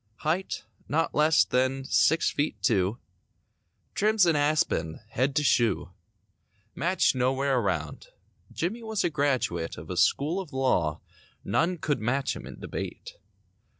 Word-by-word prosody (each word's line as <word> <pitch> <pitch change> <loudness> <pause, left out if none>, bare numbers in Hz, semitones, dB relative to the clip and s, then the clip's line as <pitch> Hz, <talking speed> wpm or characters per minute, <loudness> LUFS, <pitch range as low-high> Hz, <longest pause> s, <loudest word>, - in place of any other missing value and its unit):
Height 170 +5 -1 0.3
not 165 +3 0
less 150 +1 +4
than 130 +1 0
six 160 +4 +3
feet 145 +1 -2
two. 100 -1 +2 1.0
Trim's 215 -2 +3
an 165 -2 +3
aspen—head 135 - 0
to 150 - +2
shoe. 115 -9 +2 0.8
Match 185 -1 +2
nowhere 130 +1 +1
around. 85 -8 -3 0.4
Jimmy 200 +8 -3
was 220 -2 -2
a - - 0
graduate 130 - -1
Of 80 +4 -8
a - - -3
school 140 - +2
of 180 -6 -7
law 90 - +1 0.4
None 175 +2 +1
could 150 -2 -1
match 135 +5 0
him - - -9
in - - -10
debate. - - -7
140 Hz, 130 wpm, -27 LUFS, 115-165 Hz, 1.0 s, less